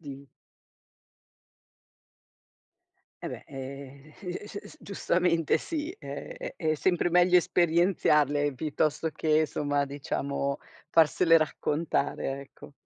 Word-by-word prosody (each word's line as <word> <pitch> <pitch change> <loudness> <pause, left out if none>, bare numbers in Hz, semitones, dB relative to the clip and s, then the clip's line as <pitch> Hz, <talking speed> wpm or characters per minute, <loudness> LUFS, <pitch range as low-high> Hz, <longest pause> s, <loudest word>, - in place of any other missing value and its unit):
Di 140 -2 -9 3.0
E - - -2
beh, - - -8
ehm, 140 +2 -9 0.4
s - - -13 0.2
s - - -15
giustamente 175 -4 +1
sì, 320 +1 -4
è - - -7
è 160 -2 0
sempre 175 +2 +1
meglio 180 +1 +5
esperienzarle 155 -5 +2
piuttosto 155 +2 -1
che, 155 0 +2
insomma 145 -2 0
diciamo, 140 0 -3 0.3
farsele 165 +1 +5
raccontare 150 -3 -1
ecco. 140 +1 -14
155 Hz, 95 wpm, -28 LUFS, 140-175 Hz, 3.0 s, meglio